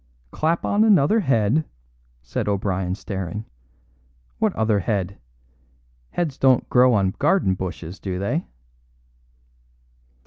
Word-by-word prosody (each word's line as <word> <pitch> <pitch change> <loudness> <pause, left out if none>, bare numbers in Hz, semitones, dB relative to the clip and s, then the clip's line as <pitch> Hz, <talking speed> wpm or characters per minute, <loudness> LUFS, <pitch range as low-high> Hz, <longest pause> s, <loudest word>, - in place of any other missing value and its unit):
"Clap 165 +2 0
on 205 +1 +3
another 210 -1 +4
head!" 135 - +2 0.6
said 60 - -3
O'Brien 95 -2 -1
staring. 95 +1 -5 0.9
"What - - +2
other 110 -1 +2
head? 95 0 -2 0.9
Heads 160 -6 -3
don't 130 -2 +3
grow 125 -1 +5
on 95 -2 +2
garden 150 - +2
bushes, 90 -1 -6
do 95 -2 -4
they?" 120 - -2
105 Hz, 105 wpm, -22 LUFS, 95-145 Hz, 0.9 s, grow